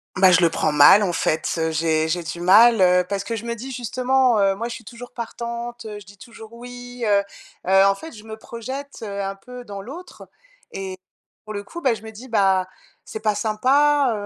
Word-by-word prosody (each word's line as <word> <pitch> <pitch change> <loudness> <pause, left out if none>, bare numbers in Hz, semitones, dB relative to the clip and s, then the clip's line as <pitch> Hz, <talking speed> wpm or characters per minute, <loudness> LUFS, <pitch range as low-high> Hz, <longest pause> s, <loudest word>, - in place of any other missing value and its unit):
Bah, 185 0 +5
je 180 - +5
le 170 - +5
prends 155 - 0
mal, 150 +8 +7
en 175 -3 -1
fait, 160 -1 0
heu, 160 0 0
j'ai 160 0 +1
j'ai 175 +1 -1
du 170 +2 -6
mal, 215 +4 +6
heu, 180 0 +4
parce 200 -1 -3
que 230 - -4
je 225 +2 -7
me 235 - -2
dis 255 +4 -8
justement: 255 0 +1
«Heu, 195 -1 +3
moi, 230 +3 -4
je 235 - -6
suis 230 - -10
toujours 245 +3 -11
partante, 235 0 -6
heu, 210 -1 -7
je 200 - -15
dis 200 0 -15
toujours: 230 -2 -13
"oui"», 245 0 -9
heu 205 -1 +4 0.5
heu, 195 +1 +5
en 195 - +4
fait, 320 +11 -10
je 210 -1 -12
me 220 0 -8
projette, 260 +6 -8
heu, 200 -1 -4
un 195 0 -4
peu 250 +5 -11
dans 200 -3 -8
l'autre 330 - -11 0.4
et 190 -1 -6 0.5
pour 215 - -7
le 205 0 -5
coup, 345 +11 -9
bah, 260 -4 +2
je 220 - -8
me 220 - -9
dis: 235 +5 -12
«Bah, 190 -4 +2 0.4
c'est 220 - -7
pas 215 -2 +1
sympa. 265 +6 +2
220 Hz, 225 wpm, -22 LUFS, 195-245 Hz, 0.5 s, mal